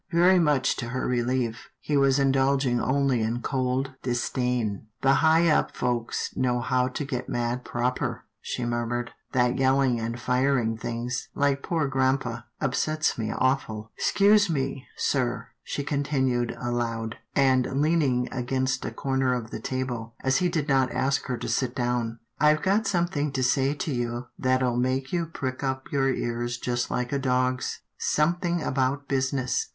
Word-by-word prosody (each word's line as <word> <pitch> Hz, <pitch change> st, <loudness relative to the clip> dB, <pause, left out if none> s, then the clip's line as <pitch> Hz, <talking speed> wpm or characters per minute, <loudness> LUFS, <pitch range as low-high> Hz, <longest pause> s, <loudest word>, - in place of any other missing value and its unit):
Very 180 Hz, +2 st, +5 dB
much 150 Hz, -5 st, +2 dB
to 120 Hz, -, -4 dB
her 130 Hz, +2 st, -2 dB
relief, 120 Hz, -1 st, -1 dB
he 150 Hz, -, -2 dB
was 140 Hz, -1 st, +4 dB
indulging 135 Hz, -2 st, +2 dB
only 135 Hz, -3 st, +1 dB
in 115 Hz, +2 st, -1 dB
cold 130 Hz, 0 st, -1 dB
disdain. 120 Hz, -3 st, -1 dB
" 120 Hz, -, -47 dB
The 135 Hz, 0 st, +5 dB
high 160 Hz, +1 st, +5 dB
up 155 Hz, -, +2 dB
folks 120 Hz, -2 st, -1 dB
know 125 Hz, -1 st, +1 dB
how 125 Hz, 0 st, +1 dB
to 135 Hz, +3 st, -4 dB
get 125 Hz, -3 st, -4 dB
mad 120 Hz, +1 st, -1 dB
proper," 125 Hz, +1 st, -2 dB, 0.2 s
she 125 Hz, -, -3 dB
murmured. 120 Hz, 0 st, -2 dB
" -, -, -48 dB
That 125 Hz, -1 st, +2 dB
yelling 130 Hz, -2 st, +3 dB
and 115 Hz, +1 st, -3 dB
firing 125 Hz, -2 st, +1 dB
things, 120 Hz, +2 st, -4 dB
like 140 Hz, -1 st, +1 dB
poor 160 Hz, -2 st, 0 dB
grampa, 130 Hz, -3 st, 0 dB
upsets 155 Hz, +2 st, 0 dB
me 110 Hz, -1 st, -1 dB
aw 130 Hz, +1 st, +3 dB
ful 110 Hz, -3 st, -9 dB
— -, -, -45 dB
'Scuse 205 Hz, 0 st, +4 dB
me, 135 Hz, -3 st, -2 dB
sir," 125 Hz, -3 st, 0 dB
she 140 Hz, -, -4 dB
continued 135 Hz, -4 st, 0 dB
aloud, 115 Hz, -2 st, -2 dB, 0.2 s
and 130 Hz, -2 st, +4 dB
leaning 145 Hz, -6 st, +2 dB
against 130 Hz, +1 st, -1 dB
a -, -, -1 dB
corner 130 Hz, +1 st, 0 dB
of 115 Hz, -2 st, -5 dB
the -, -, -4 dB
table, 120 Hz, -3 st, -4 dB
as 130 Hz, 0 st, +3 dB
he 180 Hz, -1 st, +2 dB
did 155 Hz, -4 st, -1 dB
not 135 Hz, -3 st, +3 dB
ask 135 Hz, +1 st, 0 dB
her 125 Hz, -2 st, -2 dB
to -, -, -5 dB
sit 130 Hz, -2 st, 0 dB
down, 120 Hz, -3 st, -1 dB
" -, -, -42 dB
I've 150 Hz, +1 st, +4 dB
got 200 Hz, +3 st, +2 dB
something 170 Hz, -6 st, 0 dB
to 130 Hz, -1 st, 0 dB
say 135 Hz, +3 st, +2 dB
to 145 Hz, 0 st, -3 dB
you 120 Hz, 0 st, -3 dB
that'll 130 Hz, -1 st, +1 dB
make 130 Hz, +3 st, 0 dB
you 170 Hz, -2 st, 0 dB
prick 130 Hz, -4 st, -4 dB
up 130 Hz, -1 st, -3 dB
your 135 Hz, -1 st, +2 dB
ears 120 Hz, -1 st, -2 dB
just 120 Hz, 0 st, -2 dB
like 125 Hz, 0 st, -2 dB
a 140 Hz, -, 0 dB
dog's 130 Hz, -1 st, 0 dB
— -, -, -55 dB
something 170 Hz, +2 st, +1 dB
about 135 Hz, +2 st, 0 dB
business." 130 Hz, -1 st, 0 dB
130 Hz, 170 wpm, -26 LUFS, 120-140 Hz, 0.2 s, Very